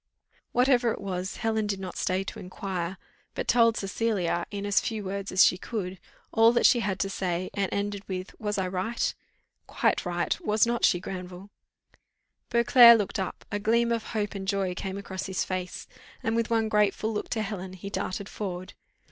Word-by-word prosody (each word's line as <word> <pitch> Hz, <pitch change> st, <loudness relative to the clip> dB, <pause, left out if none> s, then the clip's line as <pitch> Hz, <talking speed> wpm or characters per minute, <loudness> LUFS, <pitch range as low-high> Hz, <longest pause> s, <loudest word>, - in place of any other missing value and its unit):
Whatever 245 Hz, -1 st, +3 dB
it -, -, -4 dB
was, 190 Hz, -1 st, -4 dB
Helen 220 Hz, -2 st, 0 dB
did 200 Hz, -2 st, -2 dB
not 185 Hz, -2 st, -6 dB
stay 185 Hz, +1 st, 0 dB
to -, -, -7 dB
inquire, 185 Hz, -1 st, -4 dB, 0.4 s
but -, -, -3 dB
told 230 Hz, -2 st, +4 dB
Cecilia, 195 Hz, -4 st, -1 dB
in 200 Hz, -1 st, -5 dB
as 205 Hz, -1 st, +3 dB
few 220 Hz, -2 st, -3 dB
words 200 Hz, +1 st, -4 dB
as 185 Hz, -, +7 dB
she 180 Hz, -, +2 dB
could, 190 Hz, -5 st, -4 dB, 0.3 s
all 225 Hz, +1 st, +6 dB
that 240 Hz, -, +3 dB
she 240 Hz, -, +6 dB
had 195 Hz, -4 st, -1 dB
to -, -, +1 dB
say; 185 Hz, -2 st, -2 dB
and 200 Hz, -2 st, -1 dB
ended 200 Hz, 0 st, -2 dB
with 185 Hz, 0 st, -4 dB
"Was 210 Hz, -2 st, -2 dB
I 190 Hz, -1 st, 0 dB
right?" 190 Hz, +6 st, -1 dB, 0.5 s
"Quite -, -, +1 dB
right, -, -, -1 dB
was 215 Hz, -5 st, +3 dB
not 235 Hz, 0 st, +2 dB
she, 175 Hz, -, +3 dB
Granville?" 185 Hz, +1 st, -7 dB, 1.0 s
Beauclerc 235 Hz, 0 st, +8 dB
looked 205 Hz, -3 st, -2 dB
up 190 Hz, -, -4 dB
a 205 Hz, -, -1 dB
gleam 235 Hz, +3 st, +2 dB
of 230 Hz, -1 st, -1 dB
hope 210 Hz, -2 st, -2 dB
and 195 Hz, -1 st, -6 dB
joy 195 Hz, -2 st, 0 dB
came 190 Hz, +1 st, -5 dB
across 190 Hz, -1 st, -5 dB
his 190 Hz, -, -1 dB
face, 185 Hz, -1 st, -4 dB, 0.4 s
and, 225 Hz, -, 0 dB
with 230 Hz, 0 st, 0 dB
one 225 Hz, -1 st, +2 dB
grateful 210 Hz, +1 st, +1 dB
look 210 Hz, -, -3 dB
to 225 Hz, -3 st, -1 dB
Helen, 190 Hz, -3 st, -5 dB
he 195 Hz, +2 st, -8 dB
darted 195 Hz, 0 st, -3 dB
forward. 185 Hz, -4 st, -5 dB
200 Hz, 190 wpm, -27 LUFS, 185-225 Hz, 1.0 s, Beauclerc